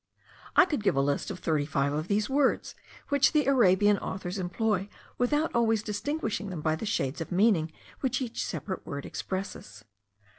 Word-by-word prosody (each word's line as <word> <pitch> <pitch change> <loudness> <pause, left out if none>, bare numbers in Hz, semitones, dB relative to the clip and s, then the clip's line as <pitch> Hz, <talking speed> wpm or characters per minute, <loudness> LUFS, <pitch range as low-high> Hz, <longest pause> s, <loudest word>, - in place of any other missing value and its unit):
I - - +8
could 300 -10 -2
give 205 - +2
a - - +2
list 140 +1 0
of - - -5
thirty 155 -3 0
five 140 -1 0
of 155 +3 -2
these 205 +1 +1
words, 275 0 +1 0.4
which 285 +1 +4
the 300 -2 +3
Arabian 205 -6 +4
authors 190 0 -4
employ 195 +2 -1 0.3
without 295 +6 +1
always 225 -2 +2
distinguishing 220 -1 -2
them 175 -4 -5
by 155 +1 +1
the 210 - -5
shades 135 -6 -1
of 165 - -5
meaning 180 -4 +3 0.3
which 255 -2 0
each 245 -4 -3
separate 190 -2 -4
word 140 0 -6
expresses. 110 - -6
200 Hz, 175 wpm, -28 LUFS, 160-235 Hz, 0.4 s, I